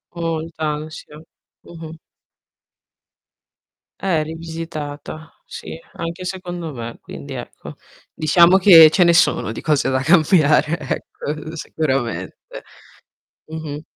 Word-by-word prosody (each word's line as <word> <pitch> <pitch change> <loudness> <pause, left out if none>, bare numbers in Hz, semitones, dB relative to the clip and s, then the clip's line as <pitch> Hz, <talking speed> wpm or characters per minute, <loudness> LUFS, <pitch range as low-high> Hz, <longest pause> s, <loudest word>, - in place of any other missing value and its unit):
Molta 165 -1 -4 0.2
ansia. 155 0 -11 0.4
Mh-mh. 165 -1 -11 2.0
Eh, 170 -5 0
rivisitata. 160 -1 -7
Sì, - - -9 0.2
anche 170 +2 -6
secondo 175 -4 -6
me 115 -1 -7
quindi, 70 0 -9
ecco, - - -9 0.4
diciamo 170 +4 +5
che 170 -5 +9
ce 180 +3 +3
ne 170 - +4
sono 165 -9 +2
di - - -6
cose 150 -3 +1
da 130 0 0
cambiare 155 0 +3
ecco, 155 +2 -6
sicuramente. 135 -6 -3 1.1
Mh-mh. 155 -2 -6
160 Hz, 100 wpm, -20 LUFS, 150-170 Hz, 2.0 s, che